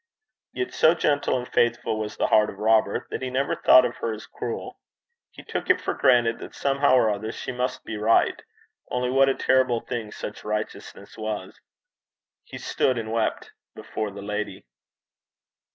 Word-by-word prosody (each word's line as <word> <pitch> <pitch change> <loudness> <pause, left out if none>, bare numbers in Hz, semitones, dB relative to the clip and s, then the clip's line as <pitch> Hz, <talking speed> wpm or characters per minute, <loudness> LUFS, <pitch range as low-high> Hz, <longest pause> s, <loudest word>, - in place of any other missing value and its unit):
Yet 375 - -4
so 160 +2 +5
gentle 145 -5 +1
and 125 0 -5
faithful 120 -2 +1
was 105 -1 -5
the - - +1
heart 110 0 +4
of - - -9
Robert, 110 -1 +2
that - - -4
he 130 - -3
never 135 +2 0
thought 130 -1 +6
of 120 - -4
her 115 - -2
as 110 - -8
cruel. 120 - -6 0.5
He - - -13
took - - -5
it - - +5
for - - -2
granted 120 -2 +3
that - - -10
somehow 140 -1 +2
or 110 -4 +4
other 105 +2 -3
she 130 - -6
must 125 +1 -3
be 110 - -5
right. 110 +2 +2 0.5
Only 125 0 -1
what 135 +1 +4
a 135 - +1
terrible 130 -3 +2
thing 115 -4 -5
such 105 - -7
righteousness 105 +1 -5
was! 105 -3 -5 0.8
He - - -10
stood 130 -2 0
and 110 -1 -4
wept 115 -1 -1 0.2
before 110 -1 -4
the 100 0 -9
lady. 105 +1 -4
115 Hz, 175 wpm, -25 LUFS, 110-130 Hz, 0.8 s, thought